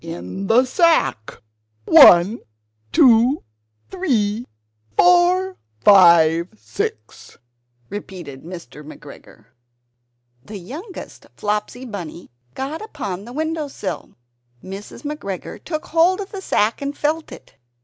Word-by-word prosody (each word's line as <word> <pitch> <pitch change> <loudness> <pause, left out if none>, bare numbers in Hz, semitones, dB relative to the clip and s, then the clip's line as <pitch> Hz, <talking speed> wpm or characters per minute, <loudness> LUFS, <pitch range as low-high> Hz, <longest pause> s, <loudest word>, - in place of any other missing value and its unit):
"In 175 +3 -6
the 240 +5 +4
sack! 320 - +1 0.4
one, 180 +7 +7 0.5
two, 245 +2 +4 0.5
three, 240 - -1 0.5
four, 360 +1 +3 0.2
five, 170 - +6
six!" 440 - -6 0.5
replied 175 -8 -8
Mr. 165 -5 -10
McGregor. 145 -6 -14 1.0
(The 210 +7 -9
youngest 300 - -10
Flopsy 210 +4 -3
Bunny 180 - -8 0.2
got 275 +4 -5
upon 200 - -6
the 240 - -10
windowsill.) 305 - -4 0.5
Mrs. 195 +8 -9
McGregor 290 -11 -6
took 310 -2 -5
hold 340 +4 +2
of 395 -1 -7
the 390 - -7
sack 220 - 0
and 280 +1 -4
felt 310 +2 -2
it. - - -13
230 Hz, 100 wpm, -20 LUFS, -, 1.0 s, one